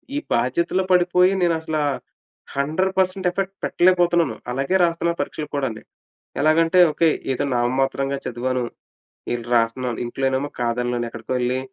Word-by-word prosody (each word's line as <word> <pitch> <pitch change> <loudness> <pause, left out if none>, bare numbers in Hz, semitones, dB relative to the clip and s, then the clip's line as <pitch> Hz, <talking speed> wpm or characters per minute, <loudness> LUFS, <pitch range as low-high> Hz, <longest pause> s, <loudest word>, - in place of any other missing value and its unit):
ఈ - - 0 0.2
బాధ్యతలో 170 +10 +1
పడిపోయి 180 +1 +4
నేను 175 -1 +3
అసలా 155 -1 -2 0.7
100% 185 +6 0
ఎఫెక్ట్ 195 +2 -3
పెట్టలేకపోతున్నాను. 175 -7 +3 0.2
అలాగే 135 +8 -1
రాస్తున్న 170 0 +1
పరీక్షలు 150 -1 -3
కూడాని. 130 -6 -2 0.6
ఎలాగంటే, 165 +3 +4
ఓకే 165 +1 +3 0.2
ఏదో 130 - -2
నామమాత్రంగా 135 +3 0
చదివాను, 125 +1 -2 0.7
ఎల్లీ 120 -1 -5
రాస్తున్నాను. 115 +1 0
ఇంట్లోనేమో 135 +3 -1
కాదనలేను 120 0 -1
ఎక్కడికో 115 0 -9
వెళ్లి 125 +1 0
140 Hz, 120 wpm, -22 LUFS, 125-175 Hz, 0.7 s, పడిపోయి